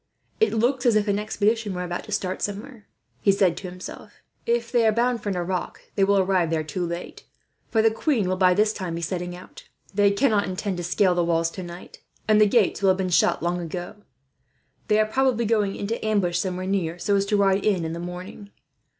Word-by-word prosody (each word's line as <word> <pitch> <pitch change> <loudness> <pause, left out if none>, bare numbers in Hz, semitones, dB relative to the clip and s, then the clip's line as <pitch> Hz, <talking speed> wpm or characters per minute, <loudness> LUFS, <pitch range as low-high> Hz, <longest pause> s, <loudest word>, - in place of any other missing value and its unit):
"That 440 - +2
looks 245 +3 +1
as 230 - +4
if 215 0 +2
an 200 0 +1
expedition 215 -1 0
were 180 - -3
about 175 0 -4
to 215 - -11
start 185 -2 -2
somewhere," 210 +2 -5 0.3
he 200 - +4
said. 190 -3 +1 0.9
"If 235 0 0
they 235 -2 +3
are - - +5
bound 235 +2 +1
for 205 - -3
Nerac, 180 -1 -4
they 195 - +1
will 200 +1 +3
arrive 185 -3 +2
there 160 -1 0
too 165 +4 -4
late; 170 +1 -6 0.4
for 220 -1 +2
the 225 - +5
queen 225 - 0
will, 185 - 0
by 185 -1 +4
this 210 +2 +2
time, 180 -5 -4
be 170 - -4
setting 175 +1 -3
out. 180 - -13 0.3
They 205 0 +4
cannot 205 -2 +2
intend 185 +1 -3
to 175 - -4
scale 180 +2 +2
the 175 0 +1
walls 165 -1 +1
tonight, 175 -1 -9 0.3
and 215 0 +5
the 210 - +6
gates 205 -2 +2
will 195 - +4
have 185 - +3
been 190 -1 -1
shut 165 -1 +2
long 175 +1 0
ago. 175 +4 -6 0.9
They 215 0 +3
are 215 - +4
probably 240 0 +1
going 210 -3 +1
into 215 +3 -4
ambush, 195 -5 +1
somewhere 185 0 -3
near, 180 -4 -1
so 200 +3 0
as 200 0 +1
to 210 - +2
ride 195 0 +2
in 190 -6 +1
in 160 - -3
the 170 - -5
morning. 180 +4 -8
195 Hz, 215 wpm, -24 LUFS, 180-215 Hz, 0.9 s, the